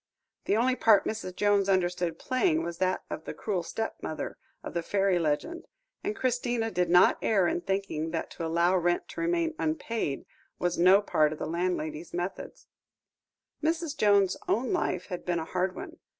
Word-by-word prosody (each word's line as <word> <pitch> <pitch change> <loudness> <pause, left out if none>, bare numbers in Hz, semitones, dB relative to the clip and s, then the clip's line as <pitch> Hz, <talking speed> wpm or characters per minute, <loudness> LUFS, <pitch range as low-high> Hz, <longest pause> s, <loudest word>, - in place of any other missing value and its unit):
The 205 - +2
only 255 +3 +2
part 215 -5 +5
Mrs. 215 -4 -4
Jones 205 -1 +2
understood 175 -3 +1
playing 315 - +1
was 170 -1 -5
that 185 0 0
of 160 - -5
the - - -6
cruel 195 -5 -2
stepmother 170 -4 -5 0.2
of - - -7
fairy 195 -1 +2
legend, 175 - -2 0.4
and 420 - -2
Christina 245 - 0
did 180 -3 0
not 180 +1 +5
err 195 -5 +3
in 175 - -1
thinking 195 -5 -2
that 165 0 -4
to 170 - -6
allow 170 +3 +2
rent 175 -1 +1
to - - -6
remain 335 -1 +1
unpaid, 230 - -2 0.3
was 175 -1 0
no 185 +4 +6
part 155 -6 +2
of - - -8
her - - -4
landlady's 170 -2 -2
methods. 175 +2 -5 1.0
Mrs. 320 -1 -1
Jones's 205 -7 +3
own 240 +3 +1
life - - -1
had 180 -3 -6
been 175 -1 -1
a 160 - -3
hard 185 +2 -1
one. 345 -1 -8
190 Hz, 170 wpm, -28 LUFS, 175-235 Hz, 1.0 s, no